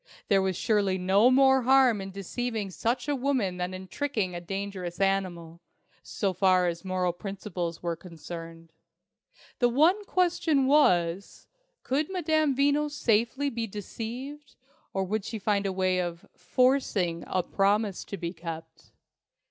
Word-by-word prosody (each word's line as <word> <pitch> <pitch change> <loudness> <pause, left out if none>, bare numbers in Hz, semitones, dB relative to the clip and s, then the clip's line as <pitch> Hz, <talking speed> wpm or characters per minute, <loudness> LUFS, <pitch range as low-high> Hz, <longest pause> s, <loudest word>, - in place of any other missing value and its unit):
There 195 -1 +4
was 190 -2 -1
surely 200 -4 +1
no 195 +6 +4
more 265 0 +5
harm 255 -4 +4
in 195 - -6
deceiving 205 +2 -4
such 235 +7 -1
a 290 - +1
woman 250 -9 0
than 180 0 -2
in 185 0 -8
tricking 215 -6 -2
a 175 - -5
dangerous 190 -1 -5
animal, 180 -4 -1 0.4
so 195 -3 -2
far 185 0 +3
as 170 +1 -3
moral 185 -2 -1
principles 180 -3 -5
were 170 -1 -1
concerned. 165 -1 -10 0.9
The 245 - +4
one 325 - +3
question 340 -7 +2
was, 185 - +2 0.4
could 285 +4 0
Madame 315 -6 +1
Veno 285 +2 +2
safely 265 0 +1
be 230 -1 -3
deceived, 240 +8 -7 0.4
or 195 - -1
would 205 +2 -2
she 220 - -5
find 200 -1 0
a - - -1
way 185 -1 +1
of 175 -1 -4
forcing 190 -5 +1
a 185 - 0
promise 200 +1 +1
to 200 - -6
be 170 -1 -4
kept? 165 -1 -9
200 Hz, 145 wpm, -28 LUFS, 180-255 Hz, 0.9 s, more